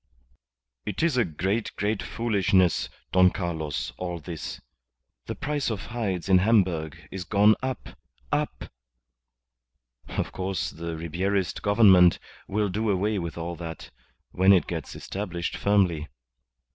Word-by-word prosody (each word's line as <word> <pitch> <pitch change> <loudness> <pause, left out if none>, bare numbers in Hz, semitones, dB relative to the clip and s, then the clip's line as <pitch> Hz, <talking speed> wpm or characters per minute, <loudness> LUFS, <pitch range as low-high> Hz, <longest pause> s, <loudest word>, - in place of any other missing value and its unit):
"It 105 - -3
is 165 -5 +2
a 125 - +4
great, 95 +6 -2
great 105 +1 -1
foolishness, 100 -6 +1 0.2
Don 90 0 +6
Carlos, 85 -6 -3
all 90 -1 -3
this. 75 -7 -6 0.7
The - - -3
price 145 -3 -2
of 105 -7 -4
hides 100 -7 -2
in 95 -1 +6
Hamburg 90 -7 +1
is 95 -2 -4
gone 105 +4 +5
up 130 -3 -4 0.4
up. - - -1 1.4
Of - - -3
course 95 -1 -2
the 85 0 -5
Ribierist 90 +3 -1
Government 100 -4 +6 0.3
will 105 +1 0
do 105 +4 -1
away 100 +2 +1
with 85 -2 -5
all 85 +1 -4
that 80 -1 -8 0.4
when 95 +2 +5
it 95 - +4
gets 80 -3 -5
established 90 -4 -4
firmly. 90 -7 +2
95 Hz, 130 wpm, -26 LUFS, 85-105 Hz, 1.4 s, Don